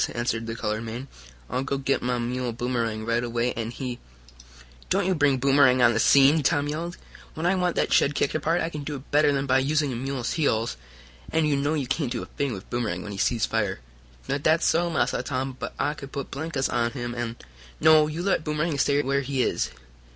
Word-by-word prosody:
answered 115 Hz, -1 st, -1 dB
the 115 Hz, -, -4 dB
colored 110 Hz, -1 st, -2 dB
man. 115 Hz, +4 st, -6 dB, 0.4 s
"I'll 125 Hz, -, -2 dB
go 135 Hz, +1 st, -2 dB
git 135 Hz, 0 st, 0 dB
mah 125 Hz, 0 st, 0 dB
mule, 120 Hz, 0 st, -2 dB
Boomerang, 115 Hz, -2 st, -2 dB
right 115 Hz, +1 st, 0 dB
away, 120 Hz, +1 st, -1 dB
an' 115 Hz, -1 st, -4 dB
he 125 Hz, 0 st, -5 dB, 0.4 s
" -, -, -22 dB
"Don't -, -, +2 dB
you 190 Hz, -, +2 dB
bring 145 Hz, -5 st, +3 dB
Boomerang 135 Hz, -1 st, +4 dB
on 120 Hz, -1 st, +6 dB
the 115 Hz, -, 0 dB
scene!" 140 Hz, +5 st, +6 dB
Tom 145 Hz, +1 st, +1 dB
yelled. 165 Hz, +4 st, -4 dB, 0.4 s
"When 160 Hz, -, -3 dB
I 180 Hz, -, +4 dB
want 180 Hz, -2 st, 0 dB
that -, -, +1 dB
shed 140 Hz, -, +3 dB
kicked 140 Hz, -, +1 dB
apart 160 Hz, +3 st, +1 dB
I 165 Hz, -, -1 dB
can 150 Hz, -3 st, -6 dB
do 145 Hz, +1 st, -4 dB
it 135 Hz, 0 st, -11 dB
better 150 Hz, 0 st, +4 dB
than 140 Hz, -1 st, 0 dB
by 130 Hz, -1 st, +3 dB
using 145 Hz, 0 st, +1 dB
a -, -, -4 dB
mule's 130 Hz, 0 st, -3 dB
heels. 115 Hz, -, 0 dB, 0.6 s
And 160 Hz, -1 st, +2 dB
you 145 Hz, -, +2 dB
know 145 Hz, +3 st, 0 dB
you 145 Hz, -3 st, -1 dB
can't 130 Hz, 0 st, -1 dB
do -, -, -3 dB
a -, -, -7 dB
thing 140 Hz, -2 st, -3 dB
with 100 Hz, -2 st, -7 dB
Boomerang 110 Hz, -7 st, -2 dB
when 105 Hz, -, -7 dB
he 100 Hz, -, -6 dB
sees 115 Hz, +2 st, +2 dB
fire." 105 Hz, -4 st, -1 dB, 0.5 s
"Now 135 Hz, +1 st, 0 dB
dat's 160 Hz, +4 st, +2 dB
so, 170 Hz, +1 st, +2 dB
Massa 165 Hz, -, 0 dB
Tom. 130 Hz, -1 st, -3 dB
But -, -, -5 dB
I 145 Hz, -, 0 dB
could 140 Hz, -2 st, -10 dB
put 140 Hz, -, -5 dB
blinkers 140 Hz, -1 st, -2 dB
on 120 Hz, -1 st, 0 dB
him, 120 Hz, -3 st, -4 dB
an' 120 Hz, -1 st, -4 dB, 0.2 s
" -, -, -21 dB
"No, 155 Hz, -1 st, +6 dB
you 160 Hz, +3 st, -4 dB
let 195 Hz, -5 st, +1 dB
Boomerang 150 Hz, 0 st, -1 dB
stay 145 Hz, +1 st, +2 dB
where 140 Hz, 0 st, +1 dB
he 135 Hz, -1 st, 0 dB
is. -, -, 0 dB
135 Hz, 230 wpm, -25 LUFS, 120-150 Hz, 0.6 s, on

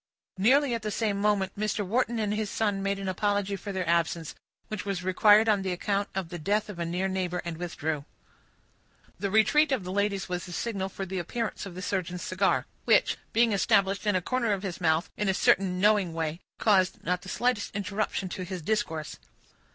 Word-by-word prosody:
Nearly 260 Hz, +6 st, +4 dB
at 230 Hz, -, -2 dB
the 215 Hz, -, -3 dB
same 205 Hz, -1 st, -1 dB
moment, 200 Hz, -2 st, +2 dB
Mr. 210 Hz, 0 st, -1 dB
Wharton 235 Hz, +3 st, 0 dB
and 210 Hz, -2 st, 0 dB
his 210 Hz, -1 st, -2 dB
son 205 Hz, -2 st, 0 dB
made 195 Hz, 0 st, 0 dB
an 195 Hz, -1 st, -5 dB
apology 200 Hz, +1 st, 0 dB
for 200 Hz, +1 st, -6 dB
their 185 Hz, -3 st, -2 dB
absence, 170 Hz, -1 st, 0 dB, 0.3 s
which 215 Hz, -4 st, -4 dB
was 195 Hz, -3 st, -3 dB
required 210 Hz, +4 st, +5 dB
on 205 Hz, -3 st, +3 dB
account 195 Hz, +2 st, -1 dB
of 190 Hz, -4 st, -2 dB
the 175 Hz, -, -6 dB
death 205 Hz, +6 st, 0 dB
of 190 Hz, -4 st, -7 dB
a 170 Hz, -, -1 dB
near 180 Hz, +3 st, -1 dB
neighbor, 185 Hz, -2 st, -2 dB
and 170 Hz, -1 st, -3 dB
withdrew. 160 Hz, -3 st, -3 dB, 1.1 s
The 200 Hz, +1 st, -1 dB
retreat 280 Hz, +9 st, +4 dB
of 255 Hz, -7 st, +1 dB
the 180 Hz, -, -5 dB
ladies 200 Hz, 0 st, 0 dB
was 180 Hz, 0 st, -4 dB
the 175 Hz, -, -8 dB
signal 195 Hz, 0 st, -2 dB
for 195 Hz, -, -5 dB
the 190 Hz, 0 st, -3 dB
appearance 215 Hz, +4 st, -3 dB
of 180 Hz, -, -10 dB
the 185 Hz, -, -6 dB
surgeon's 180 Hz, -3 st, -2 dB
cigar, 185 Hz, +1 st, +1 dB, 0.2 s
which, -, -, +4 dB, 0.2 s
being 230 Hz, 0 st, +3 dB
established 200 Hz, 0 st, +2 dB
in 205 Hz, -, +3 dB
a 185 Hz, -, 0 dB
corner 240 Hz, -2 st, +1 dB
of 195 Hz, 0 st, -3 dB
his 185 Hz, -3 st, -5 dB
mouth, 160 Hz, 0 st, +2 dB
in 210 Hz, -2 st, 0 dB
a 190 Hz, -, +2 dB
certain 185 Hz, -1 st, +3 dB
knowing 205 Hz, -4 st, +3 dB
way, 160 Hz, 0 st, -2 dB, 0.2 s
caused 190 Hz, -4 st, +2 dB
not 180 Hz, +1 st, 0 dB
the 185 Hz, -, -9 dB
slightest 245 Hz, -3 st, 0 dB
interruption 200 Hz, 0 st, -2 dB
to 185 Hz, -, -5 dB
his 180 Hz, -2 st, -6 dB
discourse. 165 Hz, -7 st, -2 dB
195 Hz, 205 wpm, -28 LUFS, 180-210 Hz, 1.1 s, required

